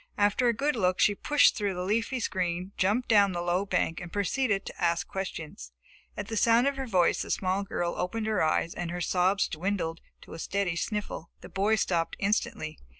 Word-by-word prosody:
After 205 +4 +3
a - - +5
good 280 +6 0
look, 185 -4 +1
she 205 - +5
pushed 295 +8 +4
through 200 -4 -1
the 180 - -3
leafy 225 +6 0
screen, 180 -3 -2
jumped 210 +7 +1
down 200 -4 +5
the 175 - -2
low 180 +3 0
bank 165 - 0
and 175 - -8
proceeded 205 0 0
to - - -7
ask 170 0 +1
questions. 155 - -6 0.4
At - - -4
the 225 - -4
sound 230 +3 +4
of 280 0 +1
her 265 -1 -4
voice 185 -6 +2
the - - -5
small 190 +1 0
girl 175 -3 -2
opened 215 +5 -2
her 215 -3 +1
eyes 160 +1 +1
and 175 -1 -4
her 175 +1 -4
sobs 185 +3 +2
dwindled 170 -1 -2 0.2
to - - -12
a 165 - -8
steady 190 -1 -1
sniffle. 205 -3 -4
The - - -10
boy 205 +3 +2
stopped 170 -5 0
instantly. 195 -6 -1
195 Hz, 205 wpm, -28 LUFS, 175-215 Hz, 0.4 s, a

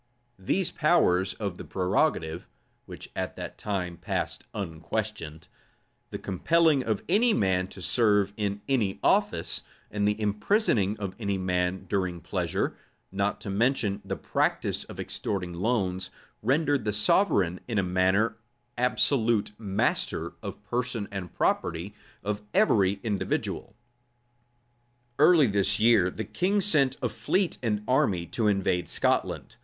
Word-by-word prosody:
[] 120 0 -40
These 190 -2 +2
powers 95 - +2
of 100 -5 -4
the - - -7
prerogative, 90 - 0 0.4
(which - - -10
at - - -3
that - - -7
time 90 -4 -3
passed - - -3
unquestioned,) 85 -2 -4 0.6
the - - -5
compelling 155 - +2
of 110 -4 -1
any 220 +5 +3
man 95 -2 +1
to 95 -1 -10
serve 105 -3 +3
in 100 -1 -2
any 115 -8 0
office, - - +1 0.3
and 105 -1 0
the 105 +1 0
imprisoning 105 - +1
of 100 -3 -5
any 100 -3 -1
man 90 0 -1
during 90 -3 -1
pleasure, - - -2 0.4
not 100 +1 -1
to 100 - -5
mention 110 -1 +1
the - - -3
practice - - -1
of - - -11
extorting 90 -4 -3
loans, 95 -2 -1 0.3
rendered 140 +2 +2
the 105 -1 -1
sovereign 105 - +3
in 115 -3 -2
a 100 - +3
manner 95 +5 +2 0.4
absolute 120 -4 +2
master 100 -3 -1
of - - -5
the - - -29
person 120 -4 -2
and 95 -3 -5
property 85 +5 0 0.3
of 105 0 -2
every 100 - +3
individual. 105 -1 -2 1.4
Early 155 0 +7
this 100 -1 +2
year 110 -5 +5
the 110 +3 -5
king 190 - 0
sent 140 -9 +2
a 125 - +1
fleet 185 - 0
and 105 -4 -1
army 130 - +2
to 110 +6 -1
invade 95 -3 +1
Scotland. - - 0
105 Hz, 135 wpm, -27 LUFS, 95-120 Hz, 1.4 s, Early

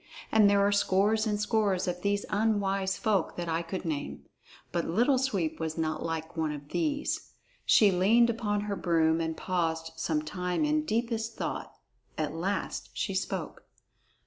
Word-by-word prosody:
And 215 -2 +6
there 200 0 +4
are 200 - +3
scores 205 +2 +2
and 210 -1 0
scores 210 -4 +1
of 180 0 -2
these 200 +1 0
unwise 200 -3 +1
folk 210 -7 0
that 175 -1 -4
I 165 0 0
could 175 +2 -5
name. 150 -3 -4 0.5
But 170 -1 -1
Little 245 - +3
Sweep 190 -12 -1
was 160 0 -3
not 160 -1 -1
like 165 0 -4
one 160 -2 0
of 145 -1 -8
these. 300 -3 -2 0.3
She 210 -3 +6
leaned 225 +6 +4
upon 210 -3 -1
her 205 -1 -2
broom 165 -2 +2
and 160 -1 -2
paused 165 -3 -1
some 155 -2 0
time 180 - -1
in 305 0 +1
deepest 230 -3 -1
thought. - - -4 0.4
At 155 -1 -1
last 185 +5 -3
she - - -2
spoke. - - -3
195 Hz, 165 wpm, -29 LUFS, 165-215 Hz, 0.5 s, And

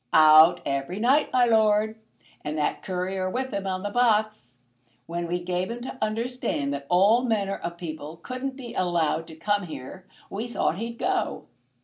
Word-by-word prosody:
"Out 155 +2 +7
every 140 +6 -2
night, 265 +6 +3
my 250 -1 +4
lord, 220 -1 +2 0.4
and 150 +1 -3
that 150 - -1
Courier 185 0 -2
with 260 +5 -3
him 200 -1 -3
on 185 0 -2
the 205 - -3
box. 215 - +1 0.5
When 170 +2 -4
we 175 +1 -1
gave 180 +1 -2
him 235 +1 -5
to 255 +1 -7
understand 215 - -2
that 140 0 -6
all 200 +7 +5
manner 205 -5 0
of 170 0 -6
people 160 -2 -7
couldn't 255 +6 -5
be 250 -3 -8
allowed 165 -3 0
to 160 - -11
come 205 +2 -1
here, 165 +6 -9 0.2
we 220 +4 -4
thought 195 -6 -1
he'd 230 +1 -5
go." 380 +5 -1
195 Hz, 170 wpm, -26 LUFS, 170-230 Hz, 0.5 s, Out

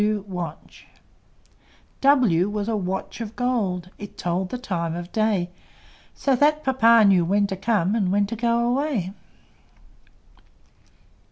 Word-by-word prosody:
W 200 -4 -2 1.5
W 235 - +3
was 210 0 -3
a 225 - 0
Watch 190 +3 -4
of 220 -1 -6
Gold: 195 -8 -1
It 205 - -10
told 180 +2 -2
the 250 - -4
time 170 -9 -3
of 175 +1 -7
day, 210 -5 0 0.6
So 275 -2 +1
that 300 +3 +2
Papa 230 -4 +5
knew 190 -3 +5
when 200 +4 +2
to 195 - -3
come, 195 -1 0
And 200 -5 0
when 200 +1 +2
to 220 +3 -5
go 235 +1 +1
away. 245 - -1
205 Hz, 135 wpm, -23 LUFS, 185-235 Hz, 1.5 s, Papa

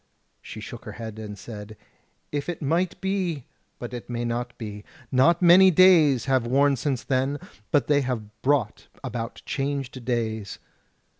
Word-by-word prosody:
She - - -9
shook - - -9
her - - -7
head 110 -1 -7
and 105 -2 -7
said: 105 0 -9 0.5
"If 145 +2 -3
it 175 - -4
might 165 +5 0
be! 185 -8 -1 0.3
but 120 0 -7
it 120 -1 -7
may 120 0 -2
not 120 +1 -3
be. 105 -2 -7 0.3
Not 165 +7 +4
many 180 +2 +8
days 160 -8 +5
have 130 -3 +1
worn 140 +3 +3
since 130 -1 -2
then; 135 +2 0 0.3
but 145 - +3
they 145 -1 +3
have 110 -5 -5
brought 130 -6 0 0.2
about 115 -1 -5
changed 135 -2 -3
days." 110 -4 -2
130 Hz, 155 wpm, -25 LUFS, 115-145 Hz, 0.5 s, many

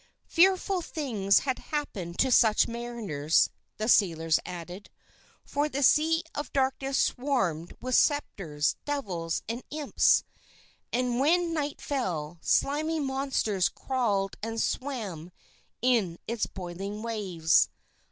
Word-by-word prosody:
Fearful 375 +1 +3
things 225 - +1
had 260 -2 -2
happened 195 - -4
to 260 - +2
such 220 -3 +5
mariners, 230 -11 0 0.3
the 215 - -2
sailors 165 -8 +3
added, 180 +3 -8 0.6
for 290 +1 -1
the 280 0 -2
Sea 325 +4 +4
of 290 - -5
Darkness 270 0 0
swarmed 235 - 0
with 255 0 -4
spectres, 180 - +1
devils, 185 - -3
and 230 +3 -3
imps. 300 -1 +3 0.7
And 245 0 0
when 335 +4 +2
night 295 -2 -2
fell, 175 - -3
slimy 305 - +1
monsters 265 -8 0
crawled 210 -7 -1
and 225 +1 -3
swam 210 - -3 0.5
in 220 -9 +2
its 230 -1 -1
boiling 195 +3 -6
waves. 185 -8 +2
235 Hz, 115 wpm, -28 LUFS, 180-280 Hz, 0.7 s, such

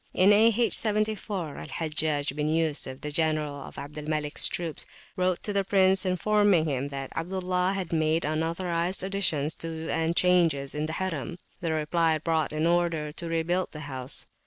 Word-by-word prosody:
In 195 +3 +6
A.H. 225 +2 +4
74, 210 -6 -1
Hajjaj 155 -3 -1
bin 150 0 -1
Yusuf, 155 -4 0
general 155 0 0
of 140 -1 -9
Abd 145 +2 -7
al 150 - -7
Maliks 150 -1 +1
troops, 170 -3 -2 0.3
wrote 185 -2 0
to 205 - -2
the 200 -1 +2
prince, 190 -1 +3
informing 200 -2 +3
him 140 -2 -1
that 135 -1 -6
Abdullah 180 +1 -1
had 190 -4 -4
made 160 0 +2
unauthorised 170 +3 -1
additions 175 -6 0
to 165 0 -5
and 165 +1 0
changes 165 -7 +3
in 150 +1 -2
the 160 - -4
Harim: 175 -2 -3 0.2
the 170 -3 -2
reply 160 +1 +1
brought 160 -1 0
an 155 +1 -1
order 170 -3 +1
to 170 +2 -5
rebuild 170 +3 0
the 150 - -7
house. 130 -3 -1
165 Hz, 160 wpm, -27 LUFS, 150-185 Hz, 0.3 s, In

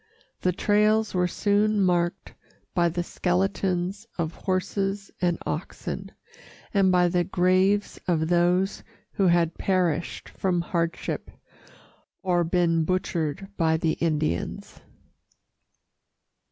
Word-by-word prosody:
The 180 - +1
trails 210 +3 +2
were 180 -1 +2
soon 205 +3 +1
marked 175 -2 0 0.4
by 175 -1 +3
the 175 +1 -2
skeletons 190 +2 -1
of 165 -2 -2
horses 195 +2 -2
and 175 -2 +2
oxen, - - -4 0.6
and 195 -2 +4
by 180 -1 +4
the 175 0 +1
graves 185 +3 +2
of 160 -3 +1
those 175 +3 +2 0.3
who 195 - +1
had 170 -1 +2
perished 175 -4 0
from 180 -2 -1
hardship 170 -1 -2 0.9
or 175 -2 +2
been 170 -1 +2
butchered 170 -1 -1
by 160 -2 +2
the 160 0 +1
Indians. 155 - -2
180 Hz, 105 wpm, -26 LUFS, 170-195 Hz, 0.9 s, and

